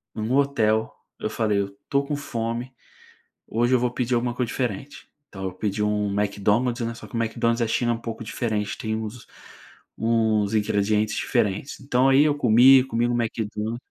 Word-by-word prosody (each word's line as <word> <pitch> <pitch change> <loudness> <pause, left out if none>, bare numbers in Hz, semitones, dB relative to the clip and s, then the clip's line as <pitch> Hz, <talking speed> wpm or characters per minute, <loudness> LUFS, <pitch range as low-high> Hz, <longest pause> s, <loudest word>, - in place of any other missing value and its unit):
em 110 - -4
um 110 +4 -1
hotel, 115 -6 +2 0.3
eu - - -2
falei: 105 -2 0
"Eu 100 - 0
estou 140 +8 -2
com 145 +1 -2
fome, 120 -1 -4 0.7
hoje 120 +3 +1
eu - - +3
vou 125 0 0
pedir 125 0 0
alguma 120 0 0
coisa 125 -1 -1
diferente", 125 +3 -4 0.2
então 95 -1 -8
eu 95 - -2
pedi 105 +2 -2
um 105 -1 0
McDonald's, 105 +4 +1
né, 115 - -4
só - - -11
que - - -10
o - - 0
McDonald's 115 +1 0
da 115 - +1
China 120 +2 +1
é - - +1
um - - -6
pouco 115 0 -6
diferente, 110 -2 -2
tem 110 -1 -3
os 110 +3 -8 0.7
uns 110 -2 +1
ingredientes 105 0 +1
diferentes. 105 +6 -1
Então 130 -1 +2
aí 135 +2 +6
eu 150 - +3
comi, 130 0 +6
comi 120 -2 0
um 120 - 0
Mcdon 110 -1 -2
115 Hz, 190 wpm, -24 LUFS, 105-125 Hz, 0.7 s, aí